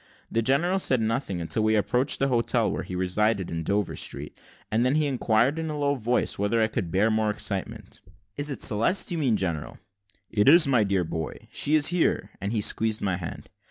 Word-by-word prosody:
The 115 - +1
general 160 - +1
said 130 -8 +2
nothing 110 -4 -2
until 85 +6 -1
we 110 0 +2
approached 125 +7 +1
the 135 - +1
hotel 120 -2 +1
where - - -3
he 90 - -7
resided, 95 +2 0
in 85 0 -3
Dover 100 +4 -1
Street; - - -5 0.4
and 110 +2 +2
then 130 +3 +2
he 155 -1 +2
inquired, 130 +1 +1
in 160 -1 -3
a 150 - -4
low 145 -1 +1
voice, 125 -5 -1
whether 105 +3 +1
I 110 - +4
could 105 -6 -3
bear 100 +6 +2
more 110 0 +1
excitement. 100 -2 -5 0.3
"Is 145 +1 -1
it 140 - -1
Celeste 115 - +2
you 170 - -2
mean, 125 -8 +1
general?" 85 -6 -4 0.5
"It 105 +4 +3
is, 165 +2 +7
my 125 -5 +3
dear 100 -2 0
boy, 80 -1 -6
she 150 - +1
is 155 -1 +4
here;" 180 - 0
and 100 +2 -3
he 110 -2 0
squeezed 110 +1 0
my 95 -3 0
hand. 85 -3 -8
110 Hz, 210 wpm, -25 LUFS, 100-135 Hz, 0.5 s, is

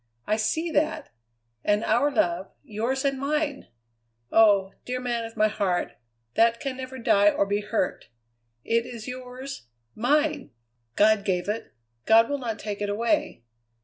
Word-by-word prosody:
I 215 - +1
see 320 +10 -1
that! 310 +1 0 0.5
And 205 +1 +2
our 285 +5 +3
love, 185 -8 0 0.2
yours 240 +6 -2
and 275 -1 0
mine! 290 0 -1 0.6
Oh! 200 -3 +5
dear 250 0 -3
man 240 -2 -2
of 225 - -10
my 215 - +4
heart, 200 -4 -1 0.4
that 230 0 +3
can 270 -2 -4
never 260 0 -7
die 205 -4 +4
or 200 - +1
be 205 +1 -1
hurt. 210 -2 -2 0.6
It 230 +1 +1
is 230 -3 -8
yours, 255 - -7 0.3
mine! 295 +4 +1 0.5
God 215 -1 +4
gave 180 -2 -1
it. 215 +2 -4 0.3
God 225 +3 +6
will 285 - -1
not 230 -4 -3
take 205 -1 -5
it 205 - -1
away. 235 - 0
230 Hz, 150 wpm, -26 LUFS, 210-265 Hz, 0.6 s, God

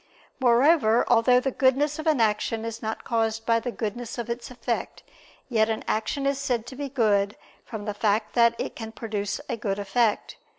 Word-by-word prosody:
Moreover, 245 -1 +4
although 250 +2 +5
the 270 +1 -1
goodness 280 +4 +2
of 315 - -4
an 305 -5 +3
action 220 +1 0
is 230 0 -5
not 220 0 -4
caused 225 -1 -1
by 230 0 +3
the 245 - -4
goodness 230 +2 -5
of 235 -1 -4
its 240 +3 -5
effect, 240 -1 -4 0.4
yet 225 -3 +2
an 220 - -2
action 275 +6 -1
is 275 0 +1
said 245 -5 -1
to 260 - -9
be 280 +1 -4
good 210 -5 +1 0.3
from 215 -3 -7
the 210 - -2
fact 210 +1 0
that 235 -1 +4
it - - -4
can 225 -1 -7
produce 210 -3 -3
a - - -2
good 200 -2 -2
effect. 205 +2 0
230 Hz, 195 wpm, -25 LUFS, 220-250 Hz, 0.4 s, although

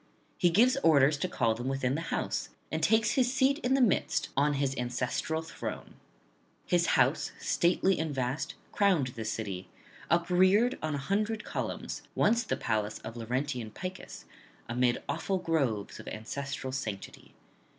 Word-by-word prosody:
He 175 - +5
gives 240 +10 +4
orders 150 - +5
to 185 - -1
call 120 -10 +1
them 120 +3 -5
within 135 -1 0
his 165 +2 -4
house, - - -2 0.2
and 160 - -1
takes 220 +5 +3
his 250 -2 +2
seat 270 +2 +2
in 260 -3 +1
the 270 - +3
midst 230 -7 +2
on 145 +2 +3
his 135 -1 0
ancestral 125 +6 -2
throne. 160 - -6 0.7
His 175 -1 +2
house, 135 +4 +2
stately 185 +2 +2
and 160 -1 -1
vast, 130 +1 -2 0.2
crowned 185 -10 +2
the 115 -2 -6
city, 100 -4 -4 0.4
upreared 185 +7 +3
on 155 -1 -1
an 140 - -3
hundred 215 +7 -1
columns, - - -4
once 230 +3 +3
the 225 - -2
palace 110 -2 -1
of 115 - -7
Laurentian 125 0 -2
Picus, 185 - -7 0.4
amid 120 0 +1
awful 195 - -1
groves 135 - -1
of - - -11
ancestral 135 +4 -5
sanctity. 110 -7 -6
150 Hz, 150 wpm, -30 LUFS, 125-190 Hz, 0.7 s, He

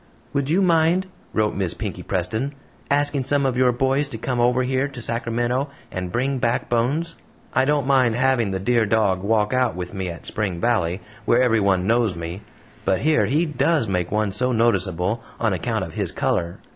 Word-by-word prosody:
"Would 140 0 -1
you 185 +5 +3
mind," 170 +1 +3 0.3
wrote 110 -1 +1
Miss 95 -4 -1
Pinkey - - -5
Preston, 110 - -2 0.3
"asking 145 -1 +1
some 140 +1 +1
of 130 -2 +1
your 125 0 +4
boys 135 +3 +1
to 130 -5 -6
come 120 +2 -2
over 125 +1 +3
here 130 +2 0
to 135 -3 -9
Sacramento 120 +3 -1 0.2
and 90 -1 -4
bring 130 +5 0
back 120 0 0
Bones? 140 +8 0 0.4
I 130 - +3
don't 145 -1 +1
mind 130 -4 +3
having 125 -3 +2
the 95 -1 -2
dear 115 +2 +2
dog 100 -4 +2
walk 105 +2 +1
out 130 -4 +1
with 90 0 -6
me 95 -2 -3
at 85 -1 -8
Spring 100 -5 -3
Valley, 95 -5 0 0.2
where 125 +2 +4
everyone 100 -6 +2
knows 115 -3 +2
me; 85 +3 -6 0.4
but 95 - +1
here 155 +1 +3
he 155 +5 +2
DOES 155 -3 +1
make 90 -3 -1
one 105 -1 +1
so 125 +6 0
noticeable, 100 -3 +1 0.2
on - - +1
account - - -1
of - - -7
HIS - - -2
COLOR. 85 +1 -1
120 Hz, 190 wpm, -22 LUFS, 100-135 Hz, 0.4 s, your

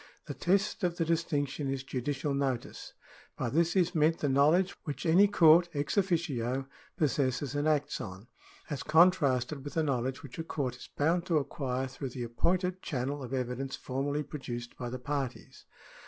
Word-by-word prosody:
The - - -5
test 195 +4 +1
of 175 -1 0
the 165 - +1
distinction 150 -4 -1
is 135 -1 -2
judicial 140 +2 -2
notice. 135 -3 -3 0.4
By 120 - -1
this 170 +4 +2
is 180 -1 +3
meant 160 0 +3
the 145 - -1
knowledge 155 +8 +4
which 150 -1 -5
any 180 +5 +6
court, 175 -2 +6
ex 145 0 -1
officio, 145 - 0 0.3
possesses 140 -2 0
and 145 +1 0
acts 150 -1 +1
on, 95 +3 -8 0.4
as 145 -4 -4
contrasted 150 -5 +3
with 145 - -7
the 160 - +2
knowledge 130 -1 -1
which 140 +2 -9
a - - -1
court 135 -6 -3
is - - -12
bound 170 +4 +1
to 165 - +3
acquire 135 -3 -2
through 135 +1 -6
the 125 0 -5
appointed 180 +10 0
channel 140 0 -3
of 130 - -7
evidence 130 +1 -2
formally 140 +3 -2
produced 120 -5 -6
by 120 - -5
the 130 - -4
parties. 135 0 -5
145 Hz, 170 wpm, -30 LUFS, 130-165 Hz, 0.4 s, any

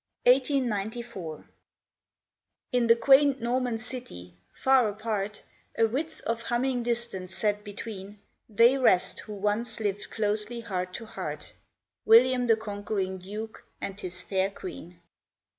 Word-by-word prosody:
CAEN 245 - +10
13 255 - -12 0.2
CAEN 245 - -1
1894 205 -6 -5 1.2
IN 245 -2 +2
the 230 - +7
quaint 275 +3 +5
Norman 245 0 0
city, 220 - -8 0.2
far 265 -4 +3
apart, 210 -1 -3 0.3
A 225 - +5
width 310 +8 -3
of 230 0 -1
humming 245 +2 0
distance 235 -6 -2
set 210 +1 0
between, 205 -1 -7 0.3
They 235 +5 +5
rest 185 -8 +3
who 215 - -8
once 210 +3 -1
lived 205 -1 -2
closely 215 +2 -1
heart 185 -5 -4
to 230 - -6
heart, - - -6 0.5
William 245 +2 +6
the 225 - +6
conquering 205 -3 -3
Duke 210 +4 -7 0.2
and 195 0 -5
his 180 -1 -4
fair 190 0 0
Queen. 180 - -9
220 Hz, 135 wpm, -28 LUFS, 200-240 Hz, 1.2 s, CAEN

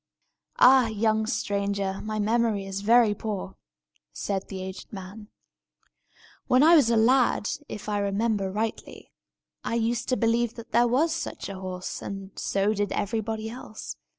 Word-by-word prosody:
"Ah, 255 -1 +7
young 220 0 0
stranger, 200 -3 -1
my 215 0 -4
memory 215 -1 +1
is 195 0 -5
very 225 0 +5
poor!" 205 -2 -5 0.6
said 195 -1 -3
the 195 - -6
aged 190 0 -8
man. 200 +2 -9 1.2
"When 255 +2 +5
I 330 +2 +7
was 280 -8 +5
a 230 - +3
lad, 245 -1 +3 0.2
if 210 - -7
I 205 -1 0
remember 200 0 0
rightly, 220 +3 -4 0.5
I - - -2
used 235 0 -1
to 255 - +2
believe 230 0 +1
there 235 +1 +1
was 300 +7 +2
such 330 - -5
a 195 -1 -7
horse, 185 -1 -5
and 195 -1 -7
so 200 +2 0
did 205 -2 -1
everybody 220 +1 -2
else. 225 -2 -8
215 Hz, 150 wpm, -26 LUFS, 200-235 Hz, 1.2 s, Ah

